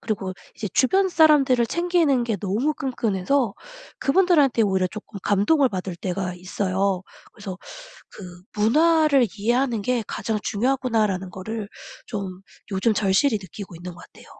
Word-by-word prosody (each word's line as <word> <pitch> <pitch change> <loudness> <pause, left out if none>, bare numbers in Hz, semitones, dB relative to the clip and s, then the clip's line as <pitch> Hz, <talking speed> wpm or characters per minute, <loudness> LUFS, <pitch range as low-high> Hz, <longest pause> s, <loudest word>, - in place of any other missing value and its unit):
그리고 195 -4 -3 0.2
이제 210 - -4
주변 380 +9 +3
사람들을 295 -7 +4
챙기는 335 -7 +1
게 225 -3 -1
너무 215 - -1
끈끈해서 235 -2 -1 0.4
그분들한테 295 -6 +3
오히려 190 -3 +2
쪼끔 215 0 -9
감동을 240 +7 +3
받을 185 -2 -4
때가 180 0 -3
있어요. 185 +1 -1 0.3
그래서 195 -4 -7 0.5
그 180 -3 -11 0.2
'문화를 305 +2 +4
이해하는 240 +1 +1
게 240 +1 -1
가장 220 -2 -3
중요하구나.'라는 220 -5 0
거를 210 +3 -6 0.4
좀 195 -4 -6 0.3
요즘 195 +4 +1
절실히 210 +4 +2
느끼고 190 -1 -10
있는 180 +1 -8
것 175 - -14
같아요. - - -17
215 Hz, 330 characters per minute, -23 LUFS, 190-270 Hz, 0.5 s, 사람들을